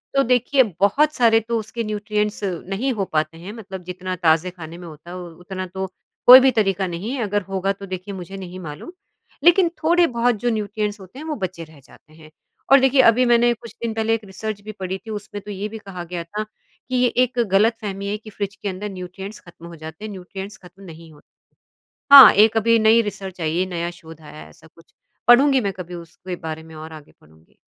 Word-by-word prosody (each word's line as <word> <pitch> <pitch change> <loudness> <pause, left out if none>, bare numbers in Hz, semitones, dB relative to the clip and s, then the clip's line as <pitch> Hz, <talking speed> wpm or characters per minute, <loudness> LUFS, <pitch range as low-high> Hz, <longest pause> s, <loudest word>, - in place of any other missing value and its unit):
तो 275 - +4
देखिए 250 +3 +3 0.2
बहुत 295 +10 +3
सारे 230 -3 +4
तो 230 +1 -2
उसके 225 +2 -5
न्यूट्रिएंट्स 210 0 -2 0.3
नहीं 225 +8 -1
हो 200 -4 -2
पाते 155 +1 -1
हैं 185 +5 -8
मतलब 190 -5 -9
जितना 185 +1 -5
ताज़े 165 +1 +2
खाने 170 -2 -10
में 175 - -10
होता 155 +2 -12
है 180 - -7
उतना 180 +2 -7
तो 190 +1 -5 0.4
कोई 250 +1 +12
भी 265 0 +4
तरीका 195 -2 +1
नहीं 180 +7 -5
है, 265 - -3
अगर 205 0 -1
होगा 195 0 -1
तो 200 0 -10
देखिए 185 +1 -6
मुझे 190 +1 -8
नहीं 185 -1 -8
मालूम। 150 - -8 0.5
लेकिन 345 +1 +5
थोड़े 345 +2 +4
बहुत 240 -1 +1
जो 245 - +1
न्यूट्रिएंट्स 210 -1 -3
होते 190 +8 -12
हैं 310 - -8
वो 305 - -2
बचे 185 -4 -5
रह 155 -2 -18
जाते 155 - -21
हैं। 155 -1 -16 0.4
और 275 - +9
देखिए 265 0 +5
अभी 250 +1 +5
मैंने 240 0 +4
कुछ 235 0 -13
दिन 230 - -2
पहले 225 0 0
एक 225 - -7
रिसर्च 205 +2 -6
भी 215 +1 -8
पढ़ी 190 -2 -5
थी - - -5
उसमें 205 0 -7
तो 210 - -8
ये 200 +1 -4
भी 220 - -8
कहा 190 -4 -8
गया 175 0 -5
था 210 +6 -5
कि 235 +3 -11
ये 245 0 +4 0.2
एक 250 0 -3
गलतफ़हमी 200 -1 +1
है 210 - -2
कि 215 0 -13
फ्रिज 200 -1 -5
के 205 - -5
अंदर 195 +2 -5
न्यूट्रिएंट्स 190 +3 -8
खत्म 170 -1 -15
हो 170 - -10
जाते 160 +5 -9
हैं, 215 - -6
न्यूट्रिएंट्स 195 +2 -8
खत्म 180 +2 -16
नहीं 165 -2 -12
होते। 150 - -21 0.9
हाँ, 270 -4 +12
एक 220 +2 +4
अभी 230 +1 +3
नई 220 +1 +5
रिसर्च 195 -4 -7
आई 160 +1 -1
है, 185 - +1
नया 170 -1 -3
शोध 160 -2 -14
आया 150 0 -12
है - - -12
ऐसा 160 - -19
कुछ, 165 +1 -23 0.3
पढ़ूँगी 265 +3 +6
मैं 200 -2 -2
कभी 180 -1 -8
उसके 175 +2 -8
बारे 160 0 -5
में 160 0 -14
और 160 +1 -9
आगे 150 -1 -13
पढ़ूँगी। 80 +1 -24
195 Hz, 225 wpm, -21 LUFS, 175-225 Hz, 0.9 s, कोई